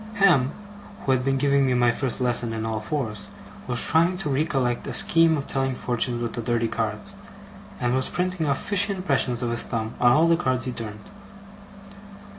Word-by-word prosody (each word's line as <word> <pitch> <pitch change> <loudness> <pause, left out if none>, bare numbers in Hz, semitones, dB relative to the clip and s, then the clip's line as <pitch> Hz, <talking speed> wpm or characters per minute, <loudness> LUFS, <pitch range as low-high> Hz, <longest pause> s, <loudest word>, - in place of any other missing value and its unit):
Ham, 175 - +3 0.5
who 135 - -1
had 130 -1 +1
been 135 0 0
giving 140 0 +2
me 130 -2 +1
my 120 -1 +3
first 130 +1 +1
lesson 120 -2 +2
in 110 0 -4
all 110 -1 -3
fours, 110 -2 -5 0.4
was 120 -1 +5
trying 170 +3 +2
to 175 -6 -3
recollect 135 -4 -1
a - - -5
scheme 165 -1 +3
of 140 - -5
telling 135 -1 -2
fortunes 120 -1 0
with 115 - -4
the 120 - -4
dirty 115 0 -1
cards, - - -3 0.7
and 120 0 0
was 130 0 +1
printing 180 -3 -2
off 140 -1 +1
fishy 200 0 +2
impressions 135 -9 0
of 120 - -2
his 120 - +2
thumb 110 -1 -4
on 120 -1 +4
all 155 +6 +4
the 165 - +4
cards 130 -6 -2
he 130 - -3
turned. 110 -3 -7
130 Hz, 195 wpm, -24 LUFS, 120-150 Hz, 0.7 s, was